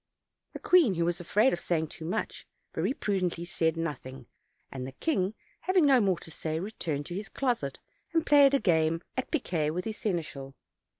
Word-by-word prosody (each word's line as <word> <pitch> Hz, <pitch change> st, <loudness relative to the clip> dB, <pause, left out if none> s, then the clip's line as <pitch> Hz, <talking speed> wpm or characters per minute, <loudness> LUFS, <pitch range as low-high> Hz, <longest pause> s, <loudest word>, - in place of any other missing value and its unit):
The -, -, -6 dB
queen, 325 Hz, -, +5 dB
who 170 Hz, 0 st, +1 dB
was 175 Hz, +1 st, -1 dB
afraid 210 Hz, +9 st, +3 dB
of 175 Hz, -, -2 dB
saying 160 Hz, -3 st, -1 dB
too 160 Hz, -, -9 dB
much, 170 Hz, -, -3 dB, 0.3 s
very -, -, 0 dB
pru 205 Hz, -7 st, -1 dB
dently 175 Hz, -1 st, -2 dB
said 165 Hz, -1 st, 0 dB
nothing; 135 Hz, -5 st, -5 dB, 0.5 s
and 130 Hz, -1 st, -5 dB
the 135 Hz, -, -8 dB
king, 200 Hz, -, 0 dB, 0.2 s
having 370 Hz, -3 st, +3 dB
no 270 Hz, -3 st, +6 dB
more 190 Hz, -4 st, +2 dB
to 165 Hz, -, -9 dB
say, 160 Hz, 0 st, -3 dB
returned 165 Hz, -7 st, -3 dB
to 175 Hz, -, -6 dB
his 195 Hz, +2 st, -5 dB
closet 235 Hz, -, -1 dB, 0.3 s
and 325 Hz, -1 st, +1 dB
played 280 Hz, -1 st, +6 dB
a -, -, +3 dB
game 165 Hz, -3 st, +2 dB
at 260 Hz, -, -2 dB
piquet 170 Hz, -, 0 dB
with 180 Hz, +4 st, -3 dB
his 220 Hz, -1 st, -4 dB
seneschal. 150 Hz, -8 st, -3 dB
175 Hz, 190 wpm, -29 LUFS, 160-225 Hz, 0.5 s, no